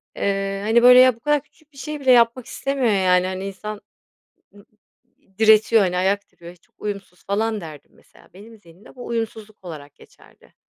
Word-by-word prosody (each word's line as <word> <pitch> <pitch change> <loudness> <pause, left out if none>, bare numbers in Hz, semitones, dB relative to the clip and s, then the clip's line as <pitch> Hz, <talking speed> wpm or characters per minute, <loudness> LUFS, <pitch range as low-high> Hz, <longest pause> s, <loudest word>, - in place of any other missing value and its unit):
Eee, 195 0 -2
hani, 230 +2 +3
böyle, 250 0 +8
"ya, 255 -1 +6
bu - - -24
kadar 295 +4 0
küçük 305 +1 -31
bir - - -19
şey 300 +3 -6
bile 265 -2 +2
yapmak 235 0 +3
istemiyor, 275 -4 -2
yani. 185 -1 +2
Hani, 190 +1 -5
insan 210 +2 -8 0.7
ı - - -18
ı 200 - -23 0.7
diretiyor, 220 0 +4
hani, 180 -2 -1
ayak 195 +2 -1
diriyor, 170 +1 -14
çok 165 - -34
uyumsuz" 200 -3 -7
falan 215 +2 -1
derdim, 155 -4 -12
mesela. - - -23
Benim 220 +4 -15
zihnimde 175 +1 -19
bu 245 - -10
uyumsuzluk 220 -3 -6
olarak 145 -4 -10
geçerdi. - - -22
210 Hz, 180 wpm, -21 LUFS, 190-235 Hz, 0.7 s, böyle